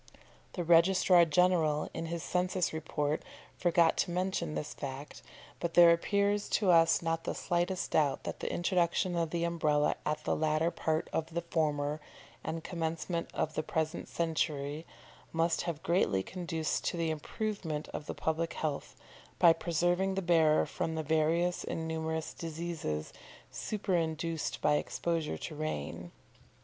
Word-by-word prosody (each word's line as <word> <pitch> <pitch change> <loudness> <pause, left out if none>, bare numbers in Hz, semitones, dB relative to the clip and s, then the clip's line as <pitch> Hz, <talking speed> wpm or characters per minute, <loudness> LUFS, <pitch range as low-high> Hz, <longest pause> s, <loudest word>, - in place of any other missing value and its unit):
The 175 - -2
Registrar 175 +1 +5
General, 160 -2 +2
in 165 0 -4
his 170 0 -4
census 180 -1 0
report, 155 -1 -1 0.3
forgot 170 -1 +3
to - - +1
mention 175 -3 -1
this 150 - -4
fact, 140 +1 -7 0.4
but 170 -1 -3
there 170 -1 +9
appears 200 +4 +1
to 195 -4 +3
us 165 0 +5
not 165 0 -1
the - - -3
slightest 175 +1 -1
doubt 145 -3 +2
that - - -5
the - - -3
introduction 175 0 +1
of 165 -1 0
the 170 +1 -1
Umbrella 155 -3 +2
at 150 0 -2
the - - 0
latter 155 +2 +1
part 160 -2 -1
of 160 +1 -2
the 170 - -1
former, 150 -3 -1 0.4
and 160 0 -4
commencement 165 0 -3
of 155 - -1
the 155 - -1
present 160 +1 -2
century, 155 -2 -2 0.4
must 165 0 +1
have 160 -2 -5
greatly 165 - +2
conduced 165 - -2
to - - -1
the 165 -1 0
improvement 160 -1 -3
of 150 - -6
the - - -4
public 160 +1 -1
health, 150 -3 -3 0.4
by 170 -1 +7
preserving 175 +3 0
the 195 - -1
bearer 160 -3 +4
from 160 - -3
the 160 - -2
various 160 +3 +1
and 160 0 -3
numerous 160 0 -3
diseases 160 - -4 0.4
superinduced 165 -5 -2
by 150 0 +4
exposure 165 -1 -2
to 160 - -6
rain. 150 - -4
165 Hz, 150 wpm, -31 LUFS, 155-175 Hz, 0.4 s, there